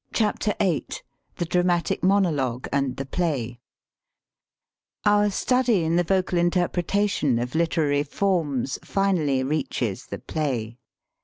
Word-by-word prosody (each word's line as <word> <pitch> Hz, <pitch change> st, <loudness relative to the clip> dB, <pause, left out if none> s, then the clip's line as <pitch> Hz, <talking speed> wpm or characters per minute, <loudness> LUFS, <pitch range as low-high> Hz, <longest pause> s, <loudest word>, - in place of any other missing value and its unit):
VIII 205 Hz, -, 0 dB, 0.5 s
THE 175 Hz, -, -2 dB
DRAMATIC 175 Hz, 0 st, +1 dB
MONOLOGUE 155 Hz, -11 st, +1 dB
AND 135 Hz, -2 st, 0 dB
THE 135 Hz, -, -4 dB
PLAY 135 Hz, -7 st, -2 dB, 1.5 s
OUR 205 Hz, 0 st, +4 dB
study 240 Hz, -1 st, +2 dB
in 160 Hz, +1 st, +1 dB
the 175 Hz, -, +3 dB
vocal 185 Hz, 0 st, +1 dB
interpretation 175 Hz, -, +1 dB
of 125 Hz, +1 st, -3 dB
literary 160 Hz, -3 st, +1 dB
forms 145 Hz, -5 st, -1 dB
finally 165 Hz, -9 st, +1 dB
reaches 130 Hz, -7 st, -2 dB
the 100 Hz, -, -5 dB
play. 125 Hz, -6 st, -3 dB
165 Hz, 105 wpm, -24 LUFS, 135-190 Hz, 1.5 s, OUR